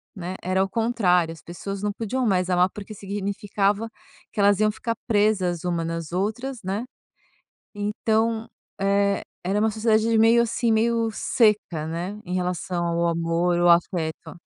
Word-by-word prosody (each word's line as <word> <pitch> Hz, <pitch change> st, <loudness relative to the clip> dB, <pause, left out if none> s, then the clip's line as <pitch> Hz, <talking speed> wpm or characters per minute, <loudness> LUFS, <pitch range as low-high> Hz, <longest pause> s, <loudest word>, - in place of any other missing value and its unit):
né. 185 Hz, -1 st, -5 dB
Era 185 Hz, +1 st, +1 dB
ao 195 Hz, -, 0 dB
contrário, 195 Hz, -7 st, +2 dB
as 160 Hz, -, -14 dB
pessoas 195 Hz, +3 st, -6 dB
não 210 Hz, -, 0 dB
podiam 230 Hz, +5 st, -2 dB
mais 185 Hz, -4 st, +1 dB
amar, 180 Hz, 0 st, +3 dB
porque 210 Hz, +1 st, -8 dB
significava 200 Hz, +1 st, -1 dB, 0.4 s
que -, -, -6 dB
elas 200 Hz, 0 st, +4 dB
iam 215 Hz, 0 st, +4 dB
ficar 230 Hz, +2 st, -3 dB
presas 205 Hz, -6 st, +1 dB
uma 170 Hz, -2 st, 0 dB
nas 165 Hz, -1 st, -4 dB
outras, 225 Hz, +7 st, -2 dB
né. 195 Hz, +5 st, -2 dB, 0.9 s
Então, 220 Hz, +2 st, 0 dB, 0.3 s
eh, 200 Hz, 0 st, +2 dB, 0.2 s
era 195 Hz, +3 st, +1 dB
uma 220 Hz, +1 st, +3 dB
sociedade 220 Hz, +1 st, +2 dB
de 230 Hz, -, +3 dB
meio, 230 Hz, +2 st, +6 dB
assim, 230 Hz, 0 st, 0 dB
meio 230 Hz, +1 st, +2 dB
seca, 210 Hz, -9 st, +1 dB
né, 175 Hz, +6 st, -4 dB
em 180 Hz, -, -4 dB
relação 180 Hz, -1 st, -2 dB
ao 170 Hz, 0 st, +1 dB
amor, 170 Hz, +1 st, +1 dB
o 175 Hz, 0 st, +4 dB
afeto. 170 Hz, -2 st, +1 dB
200 Hz, 155 wpm, -24 LUFS, 175-220 Hz, 0.9 s, meio